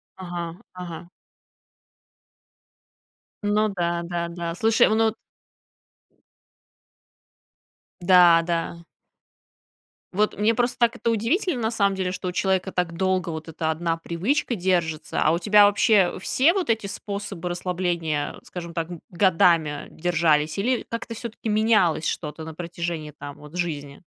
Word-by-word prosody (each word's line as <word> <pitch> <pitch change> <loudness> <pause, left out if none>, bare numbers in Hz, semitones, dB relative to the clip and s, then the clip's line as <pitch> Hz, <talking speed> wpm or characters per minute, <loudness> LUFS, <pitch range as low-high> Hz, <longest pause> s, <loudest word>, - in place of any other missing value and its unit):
Ага 175 -2 -5 0.2
ага. 175 -1 -8 2.3
Ну 210 +1 +2
да 170 -3 -1
да 170 0 -3
да, 170 -1 -4
слушай, 225 +2 +4
ну 220 0 +2 2.9
Да 175 -2 +6
да. 170 0 -2 1.3
Вот 210 +2 +1
мне, 215 +2 +3
просто, 240 +2 0
так 235 -1 +2
это 230 - -1
удивительно, 245 - 0
на 220 +1 0
самом 200 -3 +1
деле, 185 -1 -2
что 185 0 -5
у - - -1
человека 190 0 0
так 175 -2 -1
долго 185 -2 0
вот 160 0 -6
эта 160 0 -2
одна 165 +1 -1
привычка 210 - -1
держится, 175 -4 -1
а 155 - +4
у 170 - +1
тебя 205 +1 +6
вообще 205 -2 +3
все 280 - +3
вот 375 -9 -2
эти 225 -2 +1
способы 200 -3 -5
расслабления, 175 -4 -2
скажем 170 -2 -8
так, 165 +1 -3 0.2
годами 170 -5 +2
держались 160 -2 +1
или 245 +5 0
как-то 230 0 -5
всё-таки 230 0 -7
менялось 210 -7 +3
что-то 155 +1 -4
на 160 0 -7
протяжении 170 -2 -5
там 145 -1 -9
вот 150 +3 -13
жизни? 145 -4 -4
180 Hz, 130 wpm, -24 LUFS, 165-210 Hz, 2.9 s, Да